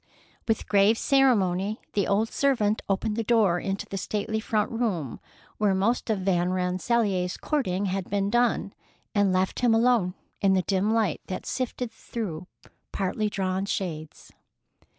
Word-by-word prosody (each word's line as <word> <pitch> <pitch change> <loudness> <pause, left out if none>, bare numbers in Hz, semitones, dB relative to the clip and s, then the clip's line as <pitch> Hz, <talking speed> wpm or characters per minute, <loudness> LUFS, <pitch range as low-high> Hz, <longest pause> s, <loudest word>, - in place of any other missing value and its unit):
With 225 -1 0
grave 205 +2 +4
ceremony, 215 -7 +2
the 200 -2 +1
old 215 +3 +1
servant 235 -8 +1
opened 210 +2 0
the 230 - 0
door 210 -6 +3
into 195 +1 -3
the 195 - -5
stately 210 +3 -2
front 215 -1 -1
room 200 - -2 0.4
where 205 -3 +3
most 225 +6 0
of 210 -3 0
Van 180 -2 +1
Rensselaer's 185 +1 0
courting 205 - -1
had 190 -1 -2
been 200 0 0
done, 240 -4 +1 0.4
and 205 -2 +3
left 185 +1 0
him 240 -2 +3
alone 225 -6 +3 0.3
in 195 -1 +4
the 185 -1 +2
dim 195 +2 +1
light 220 -6 +1
that 185 - -5
sifted 250 -2 -3
through 180 -7 -6 0.4
partly 205 +2 -1
drawn 190 -1 -1
shades. 160 -6 -5
200 Hz, 150 wpm, -26 LUFS, 185-225 Hz, 0.4 s, grave